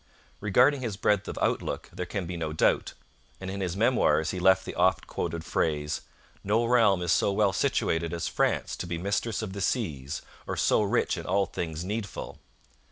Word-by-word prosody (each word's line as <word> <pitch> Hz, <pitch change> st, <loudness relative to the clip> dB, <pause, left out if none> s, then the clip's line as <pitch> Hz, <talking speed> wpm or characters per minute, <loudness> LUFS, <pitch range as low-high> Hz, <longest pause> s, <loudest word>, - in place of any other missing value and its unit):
Regarding 125 Hz, +7 st, +3 dB
his 110 Hz, -6 st, -3 dB
breadth 105 Hz, -1 st, +1 dB
of -, -, -5 dB
outlook -, -, -1 dB
there 90 Hz, -, -4 dB
can 95 Hz, -1 st, -3 dB
be 90 Hz, +1 st, -5 dB
no 80 Hz, -2 st, -3 dB
doubt, 80 Hz, -, +1 dB, 0.4 s
and 95 Hz, 0 st, -5 dB
in 100 Hz, 0 st, -4 dB
his 90 Hz, -1 st, -2 dB
Memoirs 85 Hz, -9 st, +3 dB
he 95 Hz, -, -4 dB
left 95 Hz, +1 st, +4 dB
the -, -, -5 dB
oft -, -, +2 dB
quoted 85 Hz, -1 st, -4 dB
phrase: 75 Hz, -3 st, -1 dB, 0.4 s
'No 110 Hz, +4 st, +2 dB
realm 110 Hz, -7 st, +4 dB
is 85 Hz, -, 0 dB
so 100 Hz, -, +3 dB
well 100 Hz, -1 st, +2 dB
situated 85 Hz, -3 st, 0 dB
as 85 Hz, -1 st, -2 dB
France -, -, 0 dB
to 90 Hz, -, -5 dB
be 85 Hz, -1 st, -3 dB
mistress 100 Hz, +5 st, -1 dB
of 100 Hz, -3 st, -5 dB
the 100 Hz, -, -5 dB
seas 75 Hz, -, -2 dB, 0.2 s
or -, -, -3 dB
so -, -, +3 dB
rich 100 Hz, -, +1 dB
in -, -, -8 dB
all 100 Hz, +1 st, +2 dB
things 80 Hz, -1 st, -4 dB
needful.' 105 Hz, +1 st, -5 dB
95 Hz, 190 wpm, -28 LUFS, 85-105 Hz, 0.4 s, left